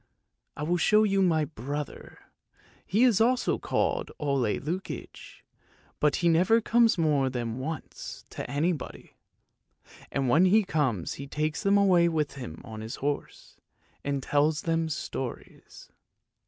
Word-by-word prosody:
I 150 - -4
will 175 +3 +1
show 210 +5 +4
you 195 -2 +2
my 160 -4 +3
brother; 145 +1 -6 0.7
he 215 +6 +3
is 230 -5 +4
also 250 +2 +2
called - - -1
Ole 140 -7 0
Lukoie, 175 +6 -6 0.6
but 150 -1 +3
he 175 - +1
never 180 +7 +4
comes 230 -1 +3
more 150 -5 +2
than 120 -1 -4
once 155 +4 -6
to - - -6
anybody, 155 +1 -3 1.0
and 135 -1 0
when 155 +9 +5
he 210 +4 +5
comes 135 - -1
he 140 - -7
takes 150 +2 -2
them 200 0 +3
away 180 -4 +4
with 155 -3 -1
him 85 - -8
on 110 -1 -8
his 110 +1 -6
horse, 145 +1 -5 0.5
and 140 -2 -2
tells 150 +2 +2
them 165 -1 0
stories. 135 -4 -7
155 Hz, 140 wpm, -28 LUFS, 140-185 Hz, 1.0 s, when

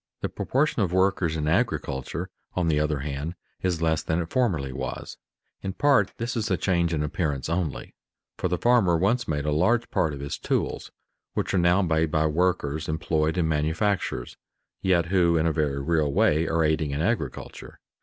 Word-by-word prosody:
The - - -1
proportion 135 -2 0
of 95 -4 +1
workers 95 -3 +2
in 75 -1 -2
agriculture, 85 - -1 0.2
on 90 -2 +1
the 75 -1 +2
other 75 -2 0
hand, 75 +4 -4 0.3
is 90 -3 -1
less 80 -1 +2
than 80 +1 -1
it 85 -1 -4
formerly 85 - 0
was. 65 0 -5 0.4
In 95 - -4
part 140 -8 +3
this 120 +2 -3
is 110 -2 -1
a 95 - +2
change 85 -3 +1
in 75 -2 0
appearance 75 -3 -2
only, 85 -4 -2 0.4
for - - -1
the 90 0 -1
farmer 110 -6 +4
once 105 +8 +1
made 75 -2 -1
a 75 - 0
large 100 +10 +2
part 80 -4 +1
of - - -9
his 70 0 -5
tools - - -2 0.5
which - - -1
are 95 - +3
now 90 +3 +4
made 80 -2 +1
by 80 0 +1
workers 80 -2 0
employed 80 +1 0
in 85 -3 +2
manufactures, 80 +6 -1 0.4
yet 90 -3 +3
who 85 -3 +4
in 80 - +1
a 80 - +3
very 75 -3 0
real 75 0 +1
way 75 +3 +3
are 80 0 +1
aiding 80 -1 +1
in 70 +2 -2
agriculture. 85 - -3
80 Hz, 185 wpm, -26 LUFS, 75-95 Hz, 0.5 s, farmer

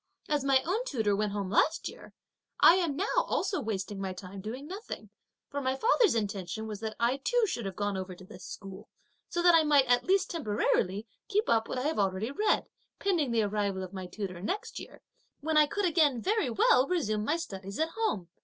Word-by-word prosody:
As 295 -2 0
my 270 -1 +3
own 400 +8 -1
tutor 220 - 0
went 210 0 0
home 200 -2 -3
last 315 +9 +2
year, - - -10 0.5
I - - +9
am 335 -6 0
now 375 +7 0
also 425 -7 +1
wasting 200 -3 -3
my 190 -1 -3
time 185 +1 -9
doing 240 +7 -6
nothing; 385 +7 -7 0.4
my 265 -2 0
father's 455 - +3
intention 205 0 -3
was 210 -2 -6
that 220 0 -4
I 240 +3 +2
too 485 - +2
should 240 - -3
have 190 - -6
gone 205 -1 -1
over 185 -1 -5
to 185 - -13
this 180 -1 -12
school, 195 0 -9 0.4
so 345 - -1
that 350 -1 +7
I 330 - +7
might 295 -3 +4
at 245 -1 +3
least 385 +1 +2
temporarily 210 - 0 0.2
keep 420 +1 +1
up 225 -1 +2
what - - -3
I 250 - -1
have 305 -4 0
already 195 +4 0
read, 420 +9 +1 0.3
pending 350 -9 +1
the 230 -2 +2
arrival 200 -2 -1
of 185 +1 -8
my 185 -1 -6
tutor 185 -2 -6
next 390 - -3
year, - - -12 0.4
when 315 +2 -1
I 305 -1 +6
could 405 +6 -1
again 310 -7 +3
very 415 - +1
well 250 +3 +4
resume 215 - 0
my 300 +9 +1
studies 195 - -6
alone 320 - +1
at - - -16
home. 190 - -1
235 Hz, 210 wpm, -30 LUFS, 200-325 Hz, 0.5 s, I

